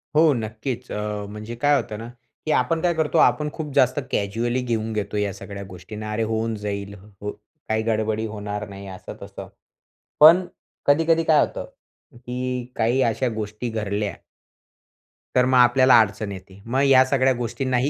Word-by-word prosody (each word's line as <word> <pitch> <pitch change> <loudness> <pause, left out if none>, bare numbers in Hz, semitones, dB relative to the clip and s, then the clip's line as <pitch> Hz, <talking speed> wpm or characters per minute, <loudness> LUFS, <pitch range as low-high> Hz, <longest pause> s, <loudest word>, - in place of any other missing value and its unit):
हो, 155 -1 +6
नक्कीच. 115 +2 -4
अ, 105 -1 -3
म्हणजे 105 +3 -7
काय 145 0 +4
होतं 110 -6 -2
ना, 115 - -7 0.4
की 155 - 0
आपण 160 +5 +1
काय 175 -1 +2
करतो, 160 0 0
आपण 140 +4 +3
खूप 150 -3 -6
जास्त 130 +2 +3
कॅज्युअली 115 +5 -1
घेऊन 115 -2 -2
घेतो 105 0 -3
या 105 -1 0
सगळ्या 100 0 -8
गोष्टींना. 105 +4 -8
अरे, 115 +1 0
होऊन 110 0 -1
जाईल. 100 -1 -5 0.3
हो 105 0 -3 0.4
काही 110 0 +1
गडबडी 110 0 0
होणार 105 0 -5
नाही 100 0 -9
असं-तसं. 95 -1 -9 0.7
पण 170 +5 +8 0.4
कधी-कधी 165 +3 +3
काय 155 -2 +4
होतं, - - -7 0.5
की 125 0 -4
काही 120 +3 +2
अशा 120 +2 +1
गोष्टी 110 +2 -4
घडल्या 105 -3 -2 1.2
तर 125 - +5
मग 130 0 +3
आपल्याला 125 0 +6
अडचण 105 -1 0
येते. 95 +1 -11
मग 130 +4 0
या 135 -2 +7
सगळ्या 130 0 +2
गोष्टींना 125 +2 -1
ही 130 +4 +1
115 Hz, 160 wpm, -23 LUFS, 105-130 Hz, 1.2 s, पण